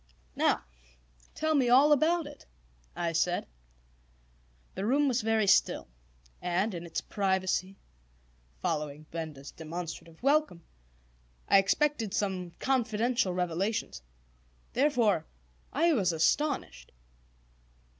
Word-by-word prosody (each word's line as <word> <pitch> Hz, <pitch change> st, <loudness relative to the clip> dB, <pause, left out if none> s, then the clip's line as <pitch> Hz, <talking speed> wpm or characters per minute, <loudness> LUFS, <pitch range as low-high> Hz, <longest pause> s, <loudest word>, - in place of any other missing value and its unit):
"Now -, -, +2 dB, 0.7 s
tell 315 Hz, 0 st, 0 dB
me 265 Hz, -5 st, +3 dB
all 270 Hz, +5 st, +6 dB
about 320 Hz, +3 st, +3 dB
it," 290 Hz, -1 st, -12 dB, 0.5 s
I 170 Hz, -1 st, -1 dB
said. 175 Hz, +2 st, +1 dB, 1.3 s
The 190 Hz, -, -4 dB
room 280 Hz, +7 st, +2 dB
was 255 Hz, -2 st, +1 dB
very 220 Hz, -1 st, +2 dB
still, 190 Hz, -, +3 dB, 0.5 s
and 185 Hz, +4 st, 0 dB
in 170 Hz, -1 st, -6 dB
its 165 Hz, -, -3 dB
privacy, 190 Hz, -1 st, -1 dB, 0.9 s
following 150 Hz, 0 st, -2 dB
Benda's 155 Hz, -4 st, -6 dB
demonstrative 165 Hz, +2 st, -8 dB
welcome, 285 Hz, -, +2 dB, 0.8 s
I 195 Hz, -, +6 dB
expected 230 Hz, +1 st, +1 dB
some 185 Hz, -3 st, -2 dB
confidential 240 Hz, -4 st, 0 dB
revelations. 180 Hz, -, -2 dB, 0.7 s
Therefore 240 Hz, -, +2 dB, 0.4 s
I 330 Hz, +3 st, +3 dB
was 195 Hz, -, +2 dB
astonished. 165 Hz, -, 0 dB
200 Hz, 100 wpm, -30 LUFS, 170-265 Hz, 1.3 s, all